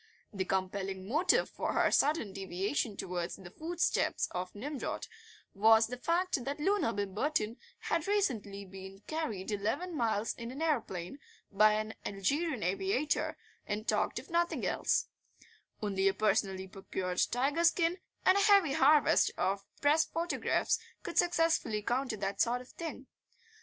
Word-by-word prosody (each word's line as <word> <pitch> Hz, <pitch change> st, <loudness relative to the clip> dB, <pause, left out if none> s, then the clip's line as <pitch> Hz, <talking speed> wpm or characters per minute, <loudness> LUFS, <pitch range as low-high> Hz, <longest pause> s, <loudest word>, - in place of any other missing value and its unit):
The 190 Hz, -2 st, -2 dB
compelling 190 Hz, 0 st, -2 dB
motive 305 Hz, -, +3 dB
for -, -, -3 dB
her -, -, +3 dB
sudden 280 Hz, -9 st, +2 dB
deviation 195 Hz, +4 st, -2 dB
towards 175 Hz, -1 st, -3 dB
the 175 Hz, -2 st, -12 dB
footsteps 340 Hz, -, 0 dB
of 180 Hz, +1 st, -4 dB
Nimrod 275 Hz, +6 st, -4 dB, 0.5 s
was 220 Hz, +2 st, +6 dB
the 250 Hz, +3 st, -6 dB
fact 340 Hz, -2 st, 0 dB
that 280 Hz, +2 st, -3 dB
Loona 375 Hz, -, +2 dB
Bimberton 215 Hz, +4 st, -1 dB, 0.2 s
had 330 Hz, 0 st, -2 dB
recently 225 Hz, -, -1 dB
been 190 Hz, +1 st, -10 dB
carried 225 Hz, -12 st, -3 dB
eleven 225 Hz, -, -2 dB
miles 225 Hz, -4 st, 0 dB
in 235 Hz, 0 st, -7 dB
an 260 Hz, +3 st, -7 dB
aeroplane 245 Hz, -, -2 dB, 0.3 s
by 215 Hz, +1 st, +5 dB
an 215 Hz, +1 st, -2 dB
Algerian 260 Hz, -, -1 dB
aviator, 195 Hz, -, 0 dB, 0.3 s
and 215 Hz, +2 st, -3 dB
talked -, -, +1 dB
of -, -, -7 dB
nothing 340 Hz, 0 st, +1 dB
else; -, -, +1 dB, 0.8 s
only 195 Hz, -2 st, +1 dB
a 195 Hz, -, +2 dB
personally 195 Hz, -2 st, +1 dB
procured 185 Hz, -1 st, -3 dB
tiger 280 Hz, +7 st, +1 dB
skin 340 Hz, +1 st, +3 dB, 0.3 s
and 375 Hz, +2 st, +6 dB
a -, -, +3 dB
heavy 400 Hz, -8 st, +5 dB
harvest 295 Hz, +1 st, +5 dB
of 195 Hz, +2 st, -1 dB
Press 300 Hz, +2 st, +4 dB
photographs 335 Hz, +3 st, 0 dB, 0.2 s
could -, -, 0 dB
successfully 330 Hz, -11 st, +2 dB
counter 250 Hz, 0 st, -1 dB
that 195 Hz, 0 st, -2 dB
sort 245 Hz, +1 st, +1 dB
of 250 Hz, -, -14 dB
thing. 315 Hz, -5 st, -7 dB
225 Hz, 140 wpm, -32 LUFS, 195-310 Hz, 0.8 s, was